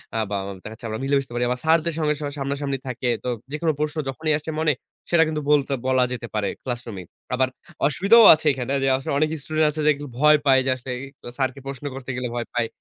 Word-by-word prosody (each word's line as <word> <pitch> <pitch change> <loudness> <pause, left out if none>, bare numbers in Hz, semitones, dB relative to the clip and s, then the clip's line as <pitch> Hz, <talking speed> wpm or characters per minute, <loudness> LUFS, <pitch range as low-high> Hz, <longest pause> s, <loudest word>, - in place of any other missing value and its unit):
আ - - 0
বা 105 - -2
আম 100 0 -7
দেখা - - -7
যাচ্ছে 110 - -11
আমরা 110 0 -4
মিলে 140 +1 +1
বসতে 135 -3 -8
পারি। 120 0 0
বা - - -6
স্যারদের 165 +1 +3
সঙ্গে 150 -1 +2
সবাই 145 -1 -4
সামনাসামনি 140 0 -2
থাকে। 125 0 -2
তো - - -2 0.2
যেকোনো 155 +2 0
প্রশ্ন 150 +1 -2
যখনই 155 +3 -1
আসছে 155 +1 -6
মনে 155 -1 +3 0.4
সেটা 170 -1 +5
কিন্তু 155 -1 -2
বলতে, 140 -2 +3
বলা 130 -1 +3
যেতে 120 -1 -5
পারে 105 -1 0 0.2
ক্লাসরুমেই। 120 -7 -5 0.3
আবার 130 0 +2 0.4
অসুবিধাও 205 +9 +6
আছে 155 0 -3
এখানে, 130 0 -3
যে - - +2
আসলে 135 - -5
অনেক 155 +1 +2
স্টুডেন্ট 155 +1 +2
আছে 155 +1 -4
যে - - +6
একটু 145 +1 -8
ভয় 150 +2 +6
পায় 135 -1 +6
যে - - +1
অ্যা - - +1
আসলেই 125 0 -5 0.4
স্যারকে 130 -1 -1
প্রশ্ন 135 +1 -6
করতে 135 -1 -8
গেলে 125 0 -2
ভয় 120 -1 -3
পায়। 120 -1 +1
135 Hz, 235 wpm, -23 LUFS, 125-150 Hz, 0.4 s, অসুবিধাও